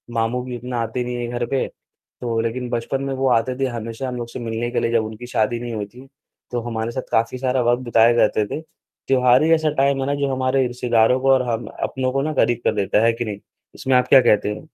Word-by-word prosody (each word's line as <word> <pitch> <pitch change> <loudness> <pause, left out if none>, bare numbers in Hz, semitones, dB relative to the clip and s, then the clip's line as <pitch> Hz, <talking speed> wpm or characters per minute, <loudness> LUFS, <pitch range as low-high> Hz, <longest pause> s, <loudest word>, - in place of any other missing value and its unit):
मामू 115 +2 0
भी 125 -1 -6
इतना 125 +1 -5
आते 115 +2 -2
नहीं 125 0 -4
है 120 0 -3
घर 120 - 0
पे, 135 +2 -1 0.5
तो 115 -2 -1
लेकिन 120 +2 -3
बचपन 120 +3 -2
में 135 - -2
वो 135 0 0
आते 125 +1 +1
थे, 135 - +2
हमेशा 115 +1 -5
हम 125 - -4
लोग 120 -1 -4
से 120 - -7
मिलने 115 0 -3
के 125 - 0
लिए 115 - 0
जब 115 -2 +2
उनकी 110 +3 -8
शादी 115 0 0
नहीं 120 -1 -5
हुई 105 -2 -3
थी, 125 +6 -15 0.4
तो 120 - -1
हमारे 115 0 -3
साथ 130 +1 -6
काफ़ी 115 +3 +1
सारा 130 0 0
वक़्त 120 +1 0
बिताए 115 0 +5
करते 110 -2 +2
थे। 150 - -5 0.5
त्योहार 125 +1 +4
ही 160 - +2
ऐसा 160 -1 0
टाइम 140 0 +2
है - - -1
ना 145 - 0
जो 140 -1 -1
हमारे 130 0 +1
रिश्तेदारों 120 0 +2
को 135 0 +4
और 130 -1 +3
हम 115 0 -2 0.2
अपनों 130 -1 -1
को 135 +1 0
ना 155 +2 -2
करीब 120 -4 +1
कर - - +2
देता 105 +1 +1
है 115 - +4
कि 120 +1 -4
नहीं? 105 -2 -5 0.4
इसमें 130 -1 0
आप 125 - +2
क्या 135 - +7
कहते 105 -3 +2
हैं? 155 - -11
120 Hz, 255 wpm, -21 LUFS, 115-130 Hz, 0.5 s, क्या